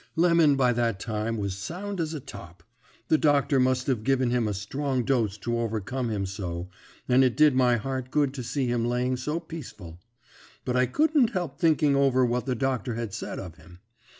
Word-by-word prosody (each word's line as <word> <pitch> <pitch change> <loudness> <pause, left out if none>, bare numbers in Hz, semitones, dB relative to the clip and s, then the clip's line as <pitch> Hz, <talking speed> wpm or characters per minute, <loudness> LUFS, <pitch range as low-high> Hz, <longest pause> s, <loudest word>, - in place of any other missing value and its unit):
"Lemon 165 -3 +4
by 125 -2 +3
that 115 -4 0
time 110 +1 -3
was 100 -2 -3
sound 180 - -5
as 160 0 -3
a - - -4
top. 85 - -12 0.5
The 155 - +4
doctor 145 -2 +3
must 130 0 +2
have 125 -6 -1
given 130 -1 +1
him 120 -3 +1
a 105 - -1
strong 130 +6 -2
dose 115 -6 0
to 120 +2 -2
overcome 115 +2 -2
him 100 -3 -2
so, 90 -2 -5 0.4
and 130 +1 +5
it 125 -2 +1
did 150 -2 +6
my 125 -1 +3
heart 130 +2 -4
good 145 -1 +1
to 135 - -5
see 130 +3 -2
him 120 -1 0
laying 125 +2 0
so 150 +6 -3
peaceful. 105 - -10 0.7
But 125 - -1
I 125 0 +3
couldn't 290 - +2
help 170 -8 -3
thinking 155 -3 +3
over 135 -2 +3
what 125 +2 -1
the 130 - 0
doctor 125 -2 -1
had 115 -3 -4
said 110 - -5
of 85 -4 -8
him. 90 +1 -16
125 Hz, 200 wpm, -26 LUFS, 110-140 Hz, 0.7 s, did